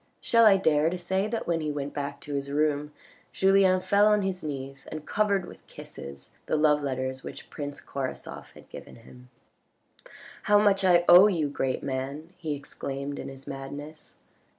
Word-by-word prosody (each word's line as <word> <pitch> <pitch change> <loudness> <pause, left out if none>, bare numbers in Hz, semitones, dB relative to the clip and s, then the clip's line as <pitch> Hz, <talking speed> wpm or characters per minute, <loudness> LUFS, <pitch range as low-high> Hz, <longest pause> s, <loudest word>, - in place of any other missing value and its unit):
Shall 230 -1 +4
I 195 -2 +6
dare 155 -3 +2
to 180 - -3
say 190 +3 -1
that 225 +1 -3
when 165 -1 0
he 155 - -2
went 145 -1 -4
back 140 0 -4
to 145 - -7
his 140 0 -3
room 150 0 0 0.4
Julien 190 -1 +4
fell 205 +2 +3
on 210 -1 +3
his 190 -1 -3
knees 135 -2 -6
and 155 -1 -7
covered 200 0 +1
with - - -14
kisses 70 0 -11 0.2
the - - 0
love 150 -1 +3
letters 130 -1 -3
which - - -10
prince 145 -1 -6
Korasoff 135 -2 -6
had - - -16
given - - -11
him. 125 +2 -16 0.6
" - - -19
How 205 - +7
much 200 -2 +3
I 175 -2 +4
owe 180 +4 +9
you, 165 -8 0
great 135 -2 -2
man," 140 +5 -5
he 155 -4 -3
exclaimed 140 0 -6
in - - -6
his 135 0 -12
madness. 145 +3 -9
150 Hz, 180 wpm, -27 LUFS, 140-185 Hz, 0.6 s, owe